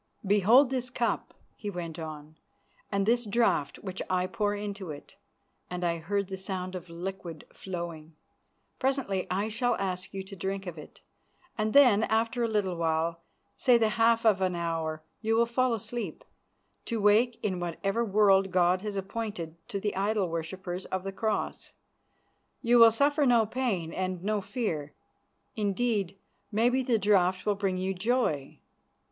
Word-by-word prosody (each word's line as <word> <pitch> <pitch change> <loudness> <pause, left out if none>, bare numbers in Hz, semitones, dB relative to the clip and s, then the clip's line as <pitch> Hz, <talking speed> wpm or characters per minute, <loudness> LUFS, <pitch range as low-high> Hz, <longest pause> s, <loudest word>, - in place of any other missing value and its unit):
"Behold 215 +7 +5
this 250 -1 -2
cup," 240 -1 -2 0.2
he 205 - -5
went 170 -4 -5
on, 155 -1 -8 0.6
"and 200 -1 +1
this 240 +2 +3
draught 215 -9 +1
which 190 -1 -5
I 185 0 +1
pour 205 +1 -1
into 200 -3 -5
it," 145 -1 -9 0.5
and 180 0 -4
I 170 -1 0
heard 200 +4 -1
the 190 0 -5
sound 185 -1 -4
of 180 -2 -7
liquid 170 -2 -6
flowing. 170 -4 -6 0.6
"Presently 260 -8 0
I 195 +3 0
shall 240 +2 0
ask 185 -2 -3
you 195 -1 -5
to 195 +1 -10
drink 195 +2 -3
of 170 -3 -6
it, 150 - -13 0.5
and 215 0 0
then, 250 -7 +7
after 230 +2 0
a 235 - +2
little 205 -5 0
while, 165 0 0 0.4
say 250 -3 +5
the 225 -2 +2
half 230 0 +3
of 205 -4 +4
an 185 -1 +1
hour, 165 -2 -2 0.2
you 225 0 +1
will 235 +1 +4
fall 255 +2 +1
asleep, 225 -4 -4 0.6
to 230 -2 -2
wake 215 +4 +3
in 185 -3 -1
whatever 195 +6 -1
world 195 -2 +4
God 180 0 +3
has 210 -1 -4
appointed 195 -4 -4
to 200 - -2
the 205 +1 -2
idol 200 -1 +1
worshippers 175 +3 -4
of 190 -1 -3
the 195 - -4
Cross. 215 +3 -2 0.9
You 240 0 +5
will 230 0 +10
suffer 285 +5 +2
no 235 -3 +5
pain 210 -9 -2
and 185 -1 -3
no 210 0 0
fear; 165 - -3 0.6
indeed, 205 -2 0 0.3
maybe 240 +5 +2
the 245 -3 +2
draught 190 -3 +2
will 210 - +3
bring 195 -2 -1
you 190 +1 -1
joy." 190 - 0
195 Hz, 160 wpm, -29 LUFS, 180-225 Hz, 0.9 s, will